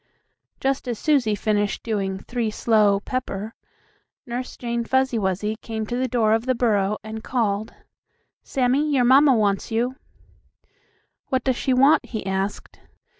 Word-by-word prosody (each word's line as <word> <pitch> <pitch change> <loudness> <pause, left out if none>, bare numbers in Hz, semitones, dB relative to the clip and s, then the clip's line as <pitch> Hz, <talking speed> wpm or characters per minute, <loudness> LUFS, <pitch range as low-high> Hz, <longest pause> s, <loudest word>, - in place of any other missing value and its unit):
Just 270 -1 -1
as 240 -2 -2
Susie 265 -8 +2
finished 205 0 -1
doing 195 -4 -2
"three 235 +3 -3
slow, 210 -2 +2
pepper," 220 -3 -4 0.7
Nurse 245 +1 -5
Jane 235 -1 -2
Fuzzy 260 -1 +1
Wuzzy 200 +2 -1
came 220 -1 -5
to 240 - -4
the 255 +1 0
door 225 -3 +2
of 225 +3 0
the 255 - +2
burrow, 210 -4 +1
and 220 +1 -7
called: 215 -4 -1 0.7
"Sammie, 270 +4 +1
your 250 -2 +3
mamma 270 +2 +6
wants 200 -3 0
you." 240 +3 -1 1.3
"What 260 -2 0
does 260 -2 +1
she 260 +1 0
want?" 275 +4 +5
he 220 -5 -5
asked. 195 +1 -3
230 Hz, 145 wpm, -23 LUFS, 210-255 Hz, 1.3 s, mamma